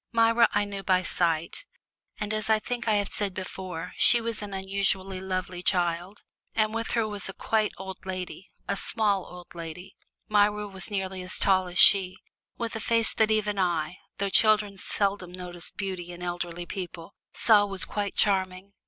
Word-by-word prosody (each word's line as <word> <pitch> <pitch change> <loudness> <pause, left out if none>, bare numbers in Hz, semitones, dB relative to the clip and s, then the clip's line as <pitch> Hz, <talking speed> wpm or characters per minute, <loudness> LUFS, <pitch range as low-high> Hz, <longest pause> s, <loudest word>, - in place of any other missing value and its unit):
Myra 230 0 +4
I 205 0 +1
knew 200 -1 -6
by 185 -1 +2
sight, 170 -2 -1 0.5
and 210 0 -3
as 215 0 -2
I 220 - +5
think 235 +2 -5
I 215 - +3
have 205 -1 0
said 200 -3 +1
before, 185 -2 -6
she 240 - +6
was 230 -2 -3
an 205 -1 -6
unusually 195 -1 -1
lovely 185 -1 -4
child. 175 +2 -1 0.3
And 215 -1 +1
with 230 0 -3
her 230 -2 +1
was 205 -2 -5
a - - -6
quite 215 +1 0
old 190 0 -8
lady, 185 0 -6 0.2
a 200 - 0
small 205 -2 0
old 180 -1 -12
lady 170 +3 -9 0.3
Myra 210 0 +2
was 195 +1 -6
nearly 190 -2 -3
as 180 0 -2
tall 190 -1 +3
as 180 0 -7
she 185 -2 +8 0.4
with 230 -2 -4
a - - -3
face 230 +1 +2
that 220 -1 +2
even 210 -2 0
I 175 -2 -1 0.2
(though 200 0 -1
children 210 -1 +4
seldom 195 -1 -2
notice 180 -1 -6
beauty 185 -3 -5
in 175 0 -9
elderly 175 0 -4
people) 175 -2 -7 0.2
saw 210 -2 +4
was 195 -2 -1
quite 205 -1 -3
charming. 190 -1 +1
195 Hz, 180 wpm, -27 LUFS, 180-210 Hz, 0.5 s, she